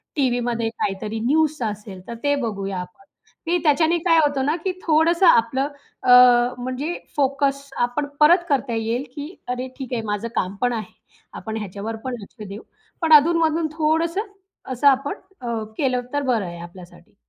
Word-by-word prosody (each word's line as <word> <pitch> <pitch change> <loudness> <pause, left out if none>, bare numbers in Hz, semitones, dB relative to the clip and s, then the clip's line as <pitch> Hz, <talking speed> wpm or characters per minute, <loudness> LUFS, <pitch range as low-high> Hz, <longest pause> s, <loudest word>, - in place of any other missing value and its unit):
टीव्हीमध्ये 245 -4 0
काहीतरी 215 0 -3
न्यूज 305 +2 +2
असेल 200 -3 -10
तर 235 - -5
ते 285 0 +2
बघूया 195 -3 -3
आपण 180 +8 -12 0.4
की 345 +2 +2
त्याच्याने 320 +2 +3
काय 330 -1 +5
होतं 285 -3 +1
ना 300 - +1
की 375 - +1
थोडंसं 330 +3 +3
आपलं 265 +2 +4 0.4
अ, - - 0 0.5
म्हणजे 255 +7 -3 0.2
फोकस 275 0 0
आपण 245 +5 0
परत 345 +4 +6
करता 270 -4 0
येईल, 225 +3 -1
की 300 +5 -7
अरे 250 +1 -3
ठीक 265 -2 -6
आहे 230 - -1
माझं 210 +2 -2
काम 185 +2 -1
पण 245 -1 +2
आहे. 220 -1 -5 0.4
आपण 220 0 -5
ह्याच्यावर 210 +2 -5
पण 255 -1 -2
लक्ष 210 +1 -11
देऊ. 200 +3 -8 0.4
पण 320 -1 +4
अधून-मधून 320 +1 +4
थोडंसं 325 +4 +1 0.5
असं 280 +4 +2
आपण 275 +1 +3 0.3
अ, 235 -2 -3
केलं 255 -3 +1
तर 285 - +1
बरं 235 -7 +1
आहे 170 -1 -7
आपल्यासाठी. 175 +1 -13
255 Hz, 165 wpm, -22 LUFS, 225-300 Hz, 0.5 s, परत